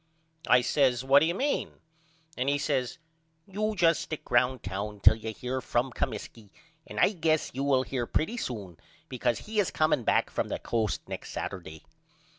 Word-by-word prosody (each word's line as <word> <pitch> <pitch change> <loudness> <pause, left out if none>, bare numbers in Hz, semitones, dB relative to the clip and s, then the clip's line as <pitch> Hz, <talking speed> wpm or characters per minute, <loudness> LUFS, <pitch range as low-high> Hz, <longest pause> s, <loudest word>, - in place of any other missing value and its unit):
I 125 - +6
says 125 -1 +2
What 135 +1 +6
do 160 - +2
you 170 - -1
mean? 280 +6 -1 0.6
And 130 +2 0
he 145 - +2
says 130 -3 -1 0.5
You 215 +2 -2
just 170 -3 +3
stick 155 - -7
round 125 +1 +2
town 100 +2 -4
till - - +7
you 110 0 -5
hear 125 +4 -4
from 125 +2 0
Comiskey 110 -1 -5 0.4
and - - -6
I - - +5
guess 160 -5 0
you 135 - -2
will 135 -2 +3
hear 125 -3 -3
pretty 220 +10 -1
soon 100 - -5 0.3
because 125 -2 0
he 215 0 -3
is 200 - +2
comeing 155 -5 +1
back - - +2
from - - -1
the - - -3
Coast 110 - -2
next - - -6
Saturday. 80 -5 -6
130 Hz, 180 wpm, -28 LUFS, 115-155 Hz, 0.6 s, till